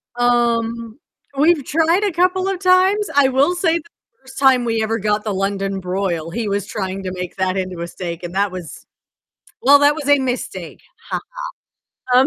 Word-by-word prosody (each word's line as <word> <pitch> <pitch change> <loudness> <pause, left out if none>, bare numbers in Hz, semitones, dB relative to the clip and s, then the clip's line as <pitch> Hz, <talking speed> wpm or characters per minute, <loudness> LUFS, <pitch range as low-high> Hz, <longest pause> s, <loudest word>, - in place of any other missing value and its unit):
Um, 235 0 0 0.4
we've 300 -1 +3
tried 330 +5 +2
a 405 - +1
couple 365 +2 +1
of 390 -2 -2
times, 380 +2 +3
I 280 -2 +5
will 280 +7 +2
say 340 -2 +2
the - - -14 0.4
1st 265 +1 -10
time 260 -3 +4
we 225 -1 0
ever 225 +1 -1
got 210 +1 0
the 215 - -2
London 195 0 -2
broil, 180 -3 -2
he 220 +5 -3
was 200 -1 -1
trying 195 -2 -4
to 185 - -4
make 180 -1 -6
that 185 0 0
into 185 -2 -4
a 170 - -3
steak, 175 -1 -6
and 175 - -6
that 200 -1 +1
was 180 -3 -9 0.8
well, 285 +2 +7
that 290 +1 +5
was 290 -3 -5
a 285 0 +6
mistake, 255 -1 -4 0.3
ha - - -1 0.9
ha, 250 - +7
um 265 - +4
235 Hz, 190 wpm, -19 LUFS, 195-290 Hz, 0.9 s, well